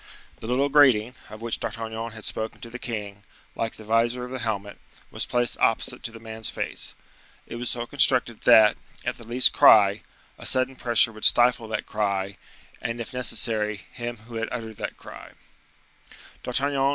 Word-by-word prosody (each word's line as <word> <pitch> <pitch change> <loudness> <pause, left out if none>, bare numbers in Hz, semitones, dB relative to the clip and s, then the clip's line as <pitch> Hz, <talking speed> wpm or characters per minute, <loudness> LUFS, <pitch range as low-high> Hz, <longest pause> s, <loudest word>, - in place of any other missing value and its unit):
The 110 - -8
little 130 +4 +1
grating, 130 -6 +4 0.2
of 110 +1 -11
which 115 - -3
D'Artagnan 115 0 -5
had 110 -1 -8
spoken 110 0 -3
to 115 - -9
the 125 - -8
king, 100 -4 -6 0.3
like 115 -1 -3
the 110 - -11
visor 115 +3 0
of 125 - -10
the 130 - -5
helmet, 100 -3 -4 0.3
was - - -3
placed 120 -1 -1
opposite 115 - 0
to 115 - -4
the 115 - -12
man's 110 0 -4
face. - - -3 0.5
It - - -8
was 120 0 -3
so 120 -1 -3
constructed 125 -3 +2
that, 110 -1 +6 0.3
at - - -3
the 115 - -13
least 125 +2 +6
cry, 100 -2 +6 0.4
a - - -4
sudden 130 +1 0
pressure 120 -2 +4
would 110 -1 -13
stifle 120 -1 +5
that 110 - -4
cry, 100 -2 -2 0.4
and, 115 0 -4
if 115 +3 -6
necessary, 110 -4 0
him 120 0 -6
who 115 -1 -8
had 115 0 -3
uttered 110 -3 -6
that - - -6
cry. - - -12
115 Hz, 175 wpm, -24 LUFS, 110-120 Hz, 0.5 s, that